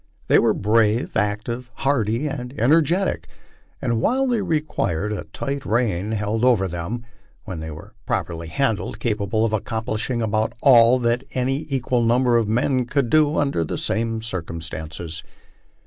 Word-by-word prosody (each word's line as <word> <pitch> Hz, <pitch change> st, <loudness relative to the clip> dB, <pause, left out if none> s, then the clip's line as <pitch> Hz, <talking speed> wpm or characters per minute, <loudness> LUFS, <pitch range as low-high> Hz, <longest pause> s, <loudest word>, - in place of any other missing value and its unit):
They -, -, +6 dB
were 115 Hz, -2 st, +3 dB
brave, 110 Hz, +2 st, +2 dB
active, 110 Hz, +4 st, -2 dB
hardy, 125 Hz, -2 st, 0 dB
and 135 Hz, -2 st, -5 dB
energetic, 155 Hz, -, +2 dB, 0.5 s
and, 115 Hz, -1 st, 0 dB
while 265 Hz, -, +2 dB
they 240 Hz, -4 st, +1 dB
required 150 Hz, -, -1 dB
a -, -, -5 dB
tight 140 Hz, 0 st, -4 dB
rein 110 Hz, -4 st, 0 dB
held 105 Hz, +2 st, -1 dB
over 115 Hz, -7 st, +4 dB
them, 95 Hz, +7 st, -5 dB, 0.4 s
were 95 Hz, -5 st, -5 dB
when 80 Hz, -1 st, -6 dB, 0.3 s
properly 85 Hz, -1 st, -2 dB
handled 110 Hz, +2 st, -1 dB
capable 110 Hz, -1 st, 0 dB
of 110 Hz, -, -1 dB
accomplishing 110 Hz, +2 st, -2 dB
about 110 Hz, 0 st, 0 dB
all 120 Hz, -2 st, +7 dB
that 120 Hz, +2 st, +1 dB
any 135 Hz, +4 st, -1 dB
equal 130 Hz, -2 st, 0 dB
number 120 Hz, +1 st, +3 dB
of 115 Hz, -2 st, +1 dB
men 125 Hz, +3 st, +1 dB
could 130 Hz, -1 st, 0 dB
do 155 Hz, -1 st, +4 dB
under 140 Hz, -, +1 dB
the -, -, -4 dB
same 115 Hz, 0 st, -1 dB
circumstances. 80 Hz, -4 st, -6 dB
115 Hz, 145 wpm, -22 LUFS, 105-130 Hz, 0.5 s, all